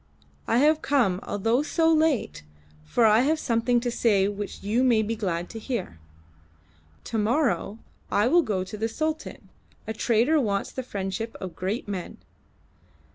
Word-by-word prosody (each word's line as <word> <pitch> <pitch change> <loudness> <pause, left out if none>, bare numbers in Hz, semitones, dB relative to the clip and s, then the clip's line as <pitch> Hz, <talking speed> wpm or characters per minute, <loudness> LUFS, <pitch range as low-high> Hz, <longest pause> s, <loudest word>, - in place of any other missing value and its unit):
I 230 - +2
have 300 +4 +4
come, 240 -11 +2
although 225 +6 0
so 325 +2 +2
late, 310 - +1 0.4
for 150 - +2
I 215 0 +6
have 300 +6 +2
something 240 -2 +1
to 240 0 -2
say 205 -5 +2
which 205 0 -6
you 220 +5 +1
may 235 -4 +4
be 225 +2 -2
glad 180 -5 -2
to 225 - -7
hear. 225 - -4 1.0
To 225 - -3
morrow 230 -2 0 0.3
I 210 +3 +2
will 345 +6 +5
go 200 - -1
to 190 +3 -8
the 225 +2 -1
Sultan; 310 +6 -4 0.4
a 220 - -4
trader 240 +8 +2
wants 200 -4 -1
the 260 - -4
friendship 205 -1 -4
of 185 -3 -7
great 195 +6 -3
men. 190 -4 -5
225 Hz, 160 wpm, -26 LUFS, 205-260 Hz, 1.0 s, I